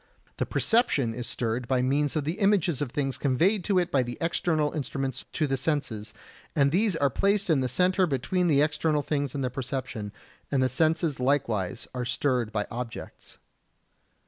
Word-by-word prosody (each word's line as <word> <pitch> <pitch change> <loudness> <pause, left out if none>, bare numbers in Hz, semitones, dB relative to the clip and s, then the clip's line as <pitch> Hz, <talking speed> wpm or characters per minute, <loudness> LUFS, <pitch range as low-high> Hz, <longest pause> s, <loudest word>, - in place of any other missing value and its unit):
The - - -1
perception 145 - +2
is 120 +1 -5
stirred 115 +1 -2
by 130 -1 +1
means 145 +3 +1
of 155 - 0
the 160 +8 -3
images 195 - +2
of 145 - -1
things 135 -2 -2
conveyed 175 - +2
to 200 -3 +2
it 175 -1 +1
by 135 - +3
the 120 -1 -4
external 165 -3 0
instruments 135 -3 -3
to 155 - +1
the 135 -2 0
senses, 115 -9 -2 0.4
and 140 -1 +3
these 200 +2 +2
are 140 -4 +2
placed 200 - +2
in 150 - +4
the 130 -1 0
centre 185 +3 +2
between 170 +6 0
the 145 -3 +4
external 150 0 0
things 145 -1 -2
and 140 - -2
the 125 - -1
perception, 125 -5 -4 0.4
and 135 -2 +2
the 130 - +2
senses 160 +1 +1
likewise 125 -8 0
are 125 -1 -2
stirred 125 -2 0
by 105 -1 -1
objects. 120 0 -7
140 Hz, 180 wpm, -27 LUFS, 125-165 Hz, 0.4 s, in